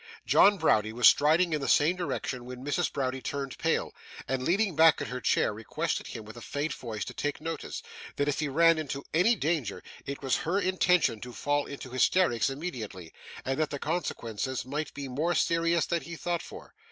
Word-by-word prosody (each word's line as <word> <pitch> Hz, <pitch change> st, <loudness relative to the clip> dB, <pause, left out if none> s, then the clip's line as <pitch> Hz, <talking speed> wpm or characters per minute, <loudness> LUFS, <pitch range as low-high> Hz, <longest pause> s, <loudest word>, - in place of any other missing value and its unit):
John 205 Hz, 0 st, +6 dB
Browdie 110 Hz, -, +2 dB
was 120 Hz, 0 st, +6 dB
striding 160 Hz, +4 st, +4 dB
in 150 Hz, -, 0 dB
the 135 Hz, -, -2 dB
same 155 Hz, +5 st, +4 dB
direction 135 Hz, -8 st, -3 dB
when 125 Hz, +1 st, -8 dB
Mrs. 145 Hz, -2 st, 0 dB
Browdie 130 Hz, -1 st, -2 dB
turned 140 Hz, -1 st, -4 dB
pale, 165 Hz, 0 st, 0 dB, 0.3 s
and, 135 Hz, -1 st, -1 dB
leaning 190 Hz, +5 st, +1 dB
back 160 Hz, 0 st, +6 dB
in -, -, -4 dB
her 125 Hz, 0 st, -5 dB
chair, -, -, +2 dB
requested 110 Hz, +1 st, -3 dB
him 110 Hz, -, -7 dB
with 110 Hz, -, -11 dB
a 120 Hz, -, -10 dB
faint 145 Hz, +6 st, -3 dB
voice 110 Hz, -5 st, -5 dB
to -, -, -7 dB
take 145 Hz, 0 st, -3 dB
notice, 165 Hz, 0 st, -5 dB, 0.3 s
that 145 Hz, -, 0 dB
if 145 Hz, -, 0 dB
he 155 Hz, -, 0 dB
ran 165 Hz, +3 st, +4 dB
into 140 Hz, -2 st, -4 dB
any 185 Hz, +9 st, +4 dB
danger 150 Hz, -, -2 dB, 0.2 s
it 140 Hz, 0 st, -5 dB
was 135 Hz, -2 st, +2 dB
her 180 Hz, +5 st, 0 dB
intention 180 Hz, -, +2 dB
to 125 Hz, -, -7 dB
fall 145 Hz, +2 st, 0 dB
into 135 Hz, -2 st, -8 dB
hysterics 130 Hz, -1 st, +2 dB
immediately, 120 Hz, -, -6 dB, 0.3 s
and 135 Hz, +3 st, -1 dB
that 155 Hz, -, +1 dB
the 145 Hz, -, -4 dB
consequences 130 Hz, -7 st, -3 dB
might 150 Hz, +3 st, -3 dB
be 140 Hz, -1 st, -5 dB
more 155 Hz, +7 st, -1 dB
serious 165 Hz, 0 st, +2 dB
than 170 Hz, -1 st, -1 dB
he 170 Hz, -, -8 dB
thought 170 Hz, +1 st, -2 dB
for. -, -, -11 dB
145 Hz, 200 wpm, -29 LUFS, 130-165 Hz, 0.3 s, John